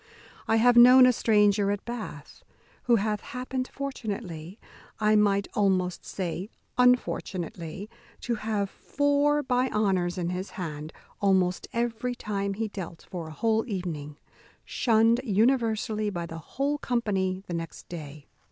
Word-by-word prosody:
I 225 - +3
have 240 +2 +5
known 250 +2 +9
a 250 - +5
stranger 210 -3 +3
at 205 0 -2
Bath, 240 -1 -7 0.4
who 240 - +5
hath 210 -1 0
happened 255 +1 -4
fortunately 205 - -5 0.4
(I 215 0 +3
might 200 -1 +3
almost 185 -3 0
say 185 +1 -4 0.3
unfortunately) 195 -7 0 0.3
to 240 - -1
have 215 -2 -1
four 290 +1 +1
by 255 0 +1
honours 190 -5 0
in 175 -1 -1
his 185 +2 -4
hand 155 -4 -5 0.3
almost 185 -2 +2
every 240 +1 -2
time 200 -3 -3
he 225 +2 -2
dealt 180 -5 -8
for 170 -3 -5
a - - -8
whole 220 +7 +1
evening, 160 - -5 0.5
shunned 230 +1 +3
universally 220 -1 +1
by 175 -4 -4
the 165 -1 -7
whole 280 - -2
company 195 -7 -1
the 175 - -6
next 165 -1 -6
day. 150 -4 -8
210 Hz, 135 wpm, -27 LUFS, 180-240 Hz, 0.5 s, known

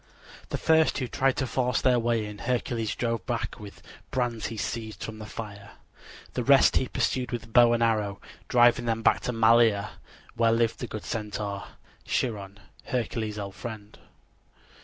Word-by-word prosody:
The - - -2
first 160 0 +3
who 130 - -2
tried 135 +2 +1
to 130 - 0
force 125 -2 0
their 125 -2 +3
way 115 -2 0
in 105 0 -8
Hercules 120 -2 -1
drove 115 -2 -1
back 120 -2 -3
with 105 -2 -11 0.3
brands 120 -4 -1
he 115 - -6
seized 110 -3 -4
from 110 -1 -6
the 110 - -8
fire. 100 -3 -8 0.6
The - - -1
rest - - +5
he - - +1
pursued 125 -1 -1
with 115 -2 -6
bow 120 -1 +7
and 120 0 +2
arrow, 105 -4 0 0.3
driving 120 0 +4
them 115 -1 -1
back - - +4
to - - -3
Malea, 115 -2 +4 0.4
where 115 0 +3
lived 115 0 +1
the 125 - -4
good 110 -1 -6
Centaur, 105 -2 -4 0.4
Chiron, 100 -5 -2 0.3
Hercules' 110 -3 -2
old 100 -2 -5
friend. 105 +2 -8
115 Hz, 165 wpm, -27 LUFS, 105-120 Hz, 0.6 s, bow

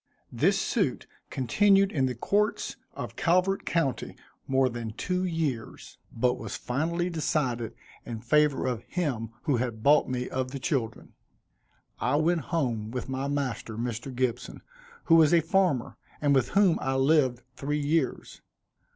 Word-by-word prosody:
This 165 +12 +2
suit 195 - 0 0.2
continued 195 - +3
in 135 -3 +1
the 125 - -3
courts 210 - 0 0.2
of - - -6
Calvert 185 +3 +1
county 155 -7 -1 0.3
more 135 0 +3
than 120 -3 -5
two 180 +9 -2
years; 155 -10 -4
but 125 +2 0
was 110 -3 -5
finally 165 +7 -1
decided 135 -9 -1 0.3
in 115 -2 -6
favor 150 +3 +2
of 125 -3 -1
him 135 - -2
who 145 -6 +1
had 115 -3 -3
bought 150 +2 +5
me 125 -1 -2
of 130 0 -2
the 135 - -5
children. 125 -4 -3 0.9
I 125 +3 +1
went 165 +2 +2
home 120 -10 -1
with 125 +2 -5
my 135 +1 -2
master, 135 -6 -3
Mr. 120 +2 -4
Gibson, 125 -2 -3 0.4
who 165 - +3
was 160 +1 +6
a - - +6
farmer, 165 -6 +1 0.2
and 145 -1 +2
with 130 -3 +2
whom 195 -5 +4
I 135 0 -1
lived 135 -3 +2
three 145 +2 -2
years. 150 +3 -1
135 Hz, 150 wpm, -28 LUFS, 125-165 Hz, 0.9 s, was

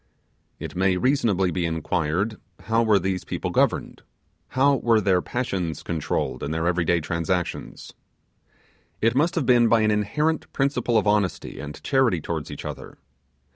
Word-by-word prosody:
It - - -7
may 95 0 +2
reasonably 100 -7 +2
be 90 +1 -1
inquired, 85 +5 -1 0.3
how 115 +1 +1
were 110 -3 +4
these 95 0 -2
people - - -4
governed? - - 0 0.5
how 140 +1 +3
were 115 -2 +3
their 95 -3 +2
passions 95 - -3
controlled 80 -3 -2
in 70 - -3
their 80 +1 -1
everyday 85 -1 +2
transactions? 85 +3 -3 1.1
It 115 +1 +2
must 160 +7 +1
have 160 -6 0
been 120 -1 +5
by 115 -1 +4
an 110 0 +3
inherent 150 +10 0
principle 135 -4 +1
of 110 - +2
honesty 105 -8 0
and 75 +1 -7
charity 130 - +2
towards 80 -1 -4
each - - -8
other. - - -8
100 Hz, 150 wpm, -24 LUFS, 85-120 Hz, 1.1 s, been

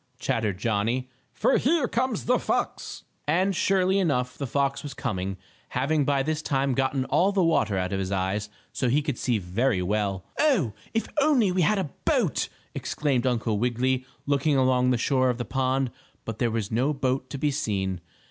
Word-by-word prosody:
chattered 105 -5 -1
Johnnie, 115 +4 0 0.2
"for - - +2
here 290 -1 +2
comes 235 - -1
the - - +3
fox!" - - -2 0.2
And, 185 +5 +2
surely 190 +1 +2
enough 125 -8 0
the 140 - -4
fox 140 +2 0
was 145 -2 -7
coming, 95 -7 -3 0.3
having 140 +3 +1
by 140 -1 +2
this 155 +2 -1
time 135 -3 0
gotten 135 +1 0
all 190 +8 +3
the 195 -2 +2
water 110 - +2
out 95 +1 -1
of 95 - 0
his 95 0 -3
eyes, 100 +2 -1 0.2
so 130 - 0
he 145 +5 +2
could 145 -4 -3
see 120 -3 +1
very 100 +2 0
well. 100 -1 -1
"Oh, 225 - +3 0.2
if 225 - +1
we - - -16
only 225 -12 +3
had 210 +6 +3
a 180 -8 -2
boat!" - - +1 0.2
exclaimed 135 -4 -1
Uncle 115 -4 0
Wiggily, 125 +2 +1 0.2
looking 140 0 +2
along 130 -1 +3
the 125 - +3
shore 130 +1 +2
of 125 - 0
the 120 - -3
pond, 130 +1 0 0.3
but 115 -1 -5
there 120 - +2
was 110 -2 -2
no 130 +7 +1
boat 130 -1 -1
to 140 - -5
be 145 +2 +1
seen. 100 - -2
130 Hz, 185 wpm, -26 LUFS, 115-150 Hz, 0.3 s, the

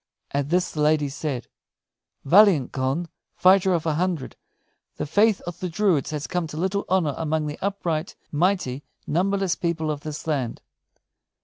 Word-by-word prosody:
At 140 0 -1
this 180 +2 +1
the 150 - -3
lady 150 -1 +3
said: 135 -3 -4 0.8
"Valiant 175 - +5
Conn, 135 +6 -1 0.3
fighter 190 0 +5
of 170 -3 0
a 160 - +1
hundred, 170 -4 -2 0.6
the - - -2
faith 205 +7 +3
of 175 0 -7
the 180 - -3
druids 175 -5 +1
has 150 -1 -3
come 180 -2 -2
to 155 - -8
little 190 +4 -1
honor 175 -6 +2
among 160 -1 -1
the 150 0 -5
upright, 180 -4 -2 0.2
mighty, 150 -5 0 0.2
numberless 195 +2 +1
people 165 -3 -1
of 150 - -4
this 150 0 -7
land. 140 -7 -2
160 Hz, 155 wpm, -24 LUFS, 150-185 Hz, 0.8 s, Valiant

